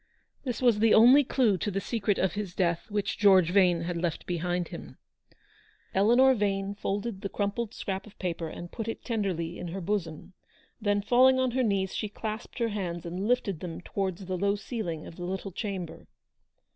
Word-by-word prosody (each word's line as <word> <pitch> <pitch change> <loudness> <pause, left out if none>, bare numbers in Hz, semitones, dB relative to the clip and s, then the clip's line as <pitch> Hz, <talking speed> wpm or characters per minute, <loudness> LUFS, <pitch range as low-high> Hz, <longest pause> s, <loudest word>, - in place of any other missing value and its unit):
This 250 0 -3
was 235 -4 +4
the 225 0 +5
only 250 +6 +8
clue 235 -7 +2
to 210 - -1
the 195 -1 -1
secret 205 -1 -1
of 190 - +1
his 205 -3 -5
death 175 -1 0
which 205 -1 -2
George 190 -4 +5
Yane 180 -4 +4
had 175 0 -3
left 170 -3 -2
behind 175 0 -2
him. - - -9 1.0
Eleanor 240 +7 +5
Yane 200 -3 -1
folded 200 0 -3
the 200 - -3
crumpled 205 +3 -2
scrap 195 +1 -4
of 210 - -16
paper, 170 -3 -3
and 175 +2 -8
put 225 - -5
it 225 - -5
tenderly 185 -7 -2
in 180 - -5
her 180 +3 -5
bosom. 180 -3 -3 0.5
Then, 205 -1 +1
falling 255 +4 +5
on 260 -1 +1
her 260 +2 +1
knees, 195 -5 0
she 215 - -3
clasped 215 +2 -6
her 235 -2 0
hands, 175 -5 -4
and 180 +4 -3
lifted 205 -8 +1
them 170 -2 -6
towards 190 0 -3
the 185 -1 -3
low 200 +1 +2
ceiling 200 -7 -4
of 165 - -11
the 175 - -6
little 190 +2 -4
chamber. 185 -4 -5
200 Hz, 190 wpm, -28 LUFS, 180-220 Hz, 1.0 s, only